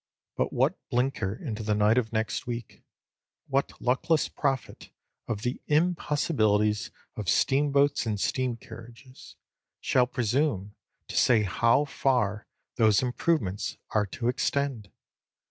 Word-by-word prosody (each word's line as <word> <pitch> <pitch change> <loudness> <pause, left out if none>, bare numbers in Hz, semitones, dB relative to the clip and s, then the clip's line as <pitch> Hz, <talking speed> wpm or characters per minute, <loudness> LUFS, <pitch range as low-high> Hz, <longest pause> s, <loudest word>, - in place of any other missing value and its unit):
But - - 0
what - - +1
blinker 125 -5 0
into 115 -6 -5
the 105 -1 0
night 105 +3 +4
of 110 -3 -4
next 110 +2 -2
week, 120 -1 -6 0.6
what 135 0 -1
luckless 135 +6 +1
prophet 135 -3 -3 0.4
of 105 -2 -3
the 125 +1 -2
impossibilities 145 - +1 0.3
of 100 -5 -3
steam 140 +2 +2
boats 140 -3 +2
and 105 -2 -1
steam 125 +2 -1
carriages, 120 +3 -13 0.4
shall 125 -1 +2
presume 120 -4 -1 0.3
to - - -7
say 115 -4 +4
how 115 - +2
far 120 -7 0 0.3
those 110 -1 +4
improvements 120 - -1
are 105 -2 +1
to 115 +5 -4
extend? 125 -3 -1
120 Hz, 125 wpm, -27 LUFS, 105-135 Hz, 0.6 s, night